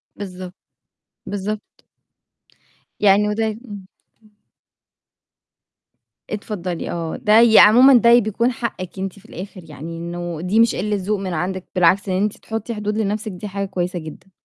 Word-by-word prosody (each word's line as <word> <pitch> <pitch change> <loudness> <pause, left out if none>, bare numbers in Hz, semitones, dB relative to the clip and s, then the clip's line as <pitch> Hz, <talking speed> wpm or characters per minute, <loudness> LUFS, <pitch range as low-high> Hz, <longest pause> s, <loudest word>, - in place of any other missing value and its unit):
بالضبط، 185 -2 -8 0.7
بالضبط. 205 +1 -5 1.2
يعني 205 +1 +4
وده 220 +2 0
إمم. 215 -3 -7 2.4
اتفضلي 190 -5 -4
آه. 165 -2 -4
ده 215 +1 +4
يا 230 -2 +7
عمومًا 250 +6 +7
ده 235 0 +6
بيكون 235 +3 0
حقِك 215 -6 -5
أنتِ 195 +1 -5
في - - -23
الآخر، 190 +2 -9
يعني 165 +1 -8
إنه 170 -1 -5
دي 190 +6 +1
مش 230 0 +4
قلة 210 +2 -1
ذوق 200 +1 -2
من 190 -2 -4
عندِك، 185 +3 -3
بالعكس 185 +3 +3
إن 185 +2 +1
أنتِ 210 0 -2
تحطي 225 +1 -5
حدود 210 0 -3
لنفسِك 215 0 -2
دي 185 +3 -7
حاجة 200 0 -3
كويسة 180 -1 -3
جدًا. 160 +4 -11
200 Hz, 140 wpm, -20 LUFS, 180-215 Hz, 2.4 s, يا